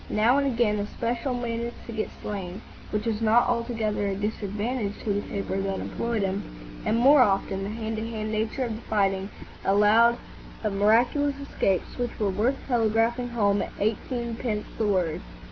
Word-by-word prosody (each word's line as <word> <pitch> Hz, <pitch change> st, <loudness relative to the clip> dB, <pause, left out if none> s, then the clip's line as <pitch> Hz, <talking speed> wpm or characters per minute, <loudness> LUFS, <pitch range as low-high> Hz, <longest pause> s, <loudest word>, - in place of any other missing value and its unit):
Now 235 Hz, +6 st, +4 dB
and 280 Hz, -, +1 dB
again 230 Hz, -5 st, +2 dB
a 205 Hz, -, -2 dB
"Special' 240 Hz, +3 st, -2 dB
managed 235 Hz, -1 st, -3 dB
to -, -, -7 dB
get 220 Hz, -1 st, -2 dB
slain,—which 205 Hz, +2 st, -5 dB
was 225 Hz, -1 st, -1 dB
not 225 Hz, +2 st, +4 dB
altogether 225 Hz, -4 st, 0 dB
a 195 Hz, -, -1 dB
disadvantage 210 Hz, +2 st, -2 dB
to 210 Hz, -, 0 dB
the 205 Hz, -, 0 dB
paper 195 Hz, -1 st, -3 dB
that 195 Hz, 0 st, -2 dB
employed 230 Hz, -3 st, -2 dB
him,—and 200 Hz, +3 st, -3 dB
more 270 Hz, +4 st, +7 dB
often 195 Hz, -3 st, +2 dB
the 195 Hz, -, -3 dB
hand 220 Hz, 0 st, -4 dB
to 225 Hz, +1 st, -3 dB
hand 215 Hz, -1 st, -3 dB
nature 220 Hz, +4 st, -1 dB
of 230 Hz, -3 st, -2 dB
the -, -, -11 dB
fighting 195 Hz, -3 st, 0 dB, 0.3 s
allowed 215 Hz, +4 st, +5 dB, 0.5 s
of 215 Hz, -2 st, 0 dB
miraculous 240 Hz, +8 st, +3 dB
escapes 195 Hz, -8 st, -1 dB
which 245 Hz, -1 st, -3 dB
were 205 Hz, -3 st, +1 dB
worth 230 Hz, +8 st, +1 dB
telegraphing 235 Hz, 0 st, +2 dB
home 205 Hz, -4 st, +2 dB
at -, -, -3 dB
eighteenpence 230 Hz, 0 st, -2 dB
the 220 Hz, -, +2 dB
word. 180 Hz, -5 st, +1 dB
220 Hz, 165 wpm, -26 LUFS, 205-235 Hz, 0.5 s, more